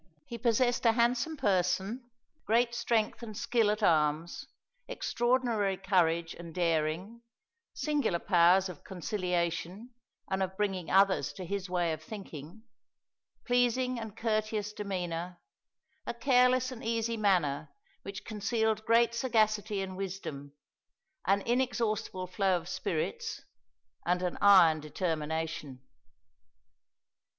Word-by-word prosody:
He 235 - -7
possessed 240 +1 +2
a 225 - +5
handsome 245 +7 +1
person, 200 +2 0 0.4
great 235 +2 +3
strength 235 -2 0
and 215 -3 -7
skill 230 -3 +2
at 210 +1 -1
arms, 155 0 +1 0.4
extraordinary 240 - 0
courage 170 -4 +1
and 170 -2 -10
daring, 170 +6 -1 0.5
singular 295 - 0
powers 180 +1 +4
of 180 -5 -10
conciliation 180 +3 -3 0.4
and 190 0 -1
of 190 0 -2
bringing 190 -5 -1
others 195 0 +3
to 185 - -7
his 195 +1 -4
way 175 -2 0
of 155 - -6
thinking, 175 0 -9 0.8
pleasing 245 0 +1
and 220 -3 -8
courteous 215 -2 -1
demeanor, 180 -4 -4 0.7
a - - -3
careless 255 0 +3
and 245 -2 -8
easy 230 0 -1
manner 175 -9 +1 0.3
which 200 0 -8
concealed 220 0 -1
great 235 0 +4
sagacity 215 -4 +1
and 190 -1 -6
wisdom, 175 -8 -6 0.7
an 200 +1 +3
inexhaustible 230 -6 -1
flow 185 0 +1
of 170 0 -8
spirits, 445 - -3 0.6
and 180 +1 0
an 180 - -1
iron 180 -6 +7
determination. 160 -3 -3
200 Hz, 115 wpm, -30 LUFS, 175-230 Hz, 0.8 s, iron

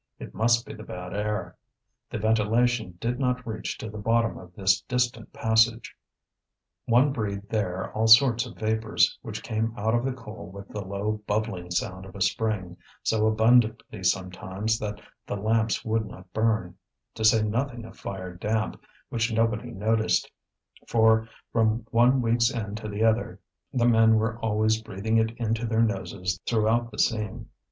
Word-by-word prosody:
It - - -9
must 115 +2 +2
be - - -8
the 110 - -10
bad 90 -4 -7
air. 105 +1 -2 0.5
The - - -4
ventilation 110 -1 +1
did 120 +3 -2
not 125 -1 0
reach 110 -1 -4
to - - -6
the 105 0 -7
bottom 115 +2 +1
of 90 -1 -11
this 95 0 +2
distant 125 -2 -1
passage. 115 +1 +2 0.9
One 125 +5 +4
breathed 100 -4 -4
there 95 -4 -2
all 110 +1 +1
sorts 115 0 +6
of - - -12
vapours, 110 0 +1
which - - -7
came 110 +1 -2
out 110 +2 0
of 120 0 +2
the 135 - 0
coal 110 -7 -10
with 100 +1 -10
the 105 - -5
low 100 +2 -3
bubbling 105 -4 -2
sound 95 -1 -3
of 95 - -13
a 100 - -8
spring, 95 -3 -1 0.3
so 110 -1 +2
abundantly 110 -1 +2
sometimes 95 +4 -1
that 105 -1 -4 0.3
the - - -2
lamps 110 +1 0
would 110 -1 0
not 90 -2 -13
burn; 110 -5 0 0.4
to 110 - -5
say 110 0 +5
nothing 120 +2 -2
of - - -12
fire 95 -2 -6
damp, 105 +4 -2 0.3
which 115 0 0
nobody 115 +1 0
noticed, 110 0 +1 0.6
for 110 0 +3 0.2
from 115 0 +1
one 125 +2 +4
week's 115 +1 +3
end 105 -4 -4
to 110 -1 -6
the 105 +1 -2
other 115 +1 +1 0.3
the 120 -2 +1
men 115 -1 +5
were 110 +1 0
always 110 0 +1
breathing 110 +1 -1
it 110 0 +3
into 115 0 -1
their 115 +1 +2
noses 95 -4 -2
throughout 115 +1 +2
the 105 - -12
seam. 105 -3 -1
110 Hz, 165 wpm, -26 LUFS, 105-115 Hz, 0.9 s, sorts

